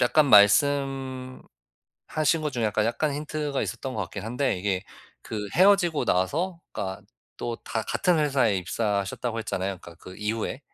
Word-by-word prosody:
약간 145 +5 +4
말씀하신 130 +4 +3 1.0
것 150 -2 -2
중에 120 -3 -1
약간, 105 0 +1
약간 130 +6 0
힌트가 150 -1 -2
있었던 130 -2 -4
것 110 - -2
같긴 95 +2 -7
한데 125 -1 -1
이게 95 -1 -1 0.4
그 105 -2 -5
헤어지고 185 -3 +4
나서 165 - 0
그러니까 95 -2 -4 0.3
또 120 -1 -4
다 110 - -2
같은 180 - +1
회사에 135 -8 +2
입사하셨다고 100 +5 -2
했잖아요 95 -3 -3
그러니까 85 - -12
그 90 +2 -12
이후에. 110 +5 -3
120 Hz, 345 characters per minute, -26 LUFS, 100-145 Hz, 1.0 s, 약간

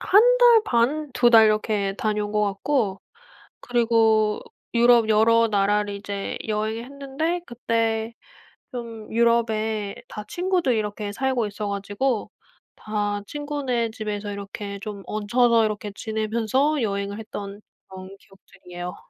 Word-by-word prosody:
1달 475 +2 +6
반, 275 - +1
2달 235 -3 +6
이렇게 210 -2 0
다녀온 210 -1 -1
거 210 0 +1
같고 200 0 0 0.6
그리고 225 -3 +2 0.4
유럽 235 -1 +5
여러 230 +1 +4
나라를 205 0 +1
이제 200 0 -5
여행을 220 +2 -2
했는데 280 +6 -3
그때 230 -1 -1 0.6
좀 230 -3 -7
유럽에 220 -3 +1
다 210 - -7
친구들이 355 -9 0
이렇게 210 -1 -3
살고 260 -2 0
있어 205 0 -5
가지고 205 +5 -2 0.5
다 205 -1 -2
친구네 280 -6 -2
집에서 210 -2 -4
이렇게 200 0 -6
좀 210 -3 -7
얹혀서 230 +2 +2
이렇게 210 -1 -3
지내면서 230 +6 0
여행을 200 0 -2
했던 205 -2 -7 0.3
그런 190 0 -10
기억들이에요. 180 -2 -10
220 Hz, 265 characters per minute, -24 LUFS, 205-240 Hz, 0.6 s, 1달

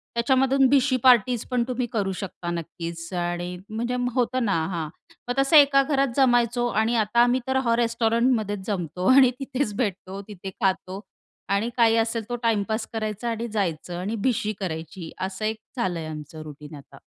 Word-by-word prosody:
त्याच्यामधून 265 +2 +3
भिशी 270 -1 +3
पार्टीज 245 -2 +4
पण 245 -1 +2
तुम्ही 250 -1 -1
करू 200 -4 -1
शकता 180 -2 -6
नक्कीच 170 0 -6
आणि 175 0 -3
म्हणजे 235 +3 -2 0.2
होतं 255 0 0
ना 200 - +1 0.2
हां, 165 -3 -2 0.4
मग 245 - 0
तसं 275 +4 +3
एका 280 -1 +6
घरात 275 -1 +1
जमायचो 245 -2 +3 0.2
आणि 230 +2 +1
आता 215 +1 +1
आम्ही 245 +1 +2
तर 265 0 +1
हां, 230 0 +3
रेस्टॉरंटमध्येच 230 -3 +1
जमतो 180 -2 -2
आणि 260 -2 +7
तिथेच 265 -5 -2
भेटतो, 195 -3 -3
तिथे 195 -2 -8
खातो 190 -1 -1 0.5
आणि 200 +4 +1
काही 230 -1 +5
असेल 225 0 0
तो 245 - -1
टाईमपास 220 0 0
करायचा 215 +1 -3
आणि 230 +1 -3
जायचं 175 -4 -2
आणि 205 +5 -3
भिशी 215 -3 0
करायची 165 -1 -5
असं 190 +3 -3
एक 220 0 -1 0.2
झालंय 175 -7 -2
आमचं 155 0 -8
रुटीन 150 0 -10
आता. 140 - -14
220 Hz, 165 wpm, -24 LUFS, 185-245 Hz, 0.5 s, आणि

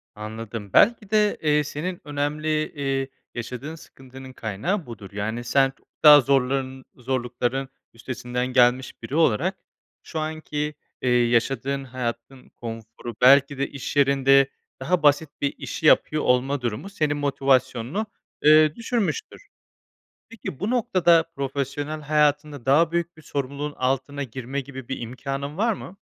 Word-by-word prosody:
Anladım. 110 -1 -7
Belki 220 -2 +4
de, 210 -1 +2
eee, 150 -1 +3
senin 170 +5 -5
önemli, 145 +1 -3 0.2
eee, 135 -2 -2 0.3
yaşadığın 125 +6 -6
sıkıntının 130 -3 -13
kaynağı 125 - -2
budur. 105 -5 -10
Yani 110 +4 -3
sen 135 +2 +3
çok - - -33 0.2
daha 150 -1 +10
zorların 130 0 0
zorlukların 125 +1 -2 0.2
üstesinden 125 +1 -4
gelmiş 125 0 +2
biri 130 +5 -5
olarak, 165 - +2 0.5
şu 160 - -5
anki, 155 -1 -3 0.3
eee, 125 - 0
yaşadığın 125 +3 +1
hayatın 125 0 -6
konforu, 115 0 -8
belki 140 +2 +6
de 140 - 0
iş 140 -1 -6
yerinde 135 -1 +4 0.3
daha 170 +5 0
basit 145 +1 +4
bir 140 - 0
işi 160 - -5
yapıyor 155 0 +4
olma 125 +2 +1
durumu 120 - -3
senin 150 -6 -1
motivasyonunu, 135 - +1 0.4
eee, 155 0 +6
düşürmüştür. 230 - -2 0.9
Peki 225 - -8
bu 205 - -2
noktada 185 -9 +3
profesyonel 140 +2 -3
hayatında 150 -2 +1
daha 155 +5 +4
büyük 170 0 -2
bir - - -13
sorumluluğun 140 0 -4
altına 135 +2 -1
girme 130 +3 -5
gibi 130 -2 -10
bir 135 - -4
imkanın 135 +5 -5
var 225 +2 +2
mı? 195 0 -10
140 Hz, 135 wpm, -24 LUFS, 125-150 Hz, 0.9 s, daha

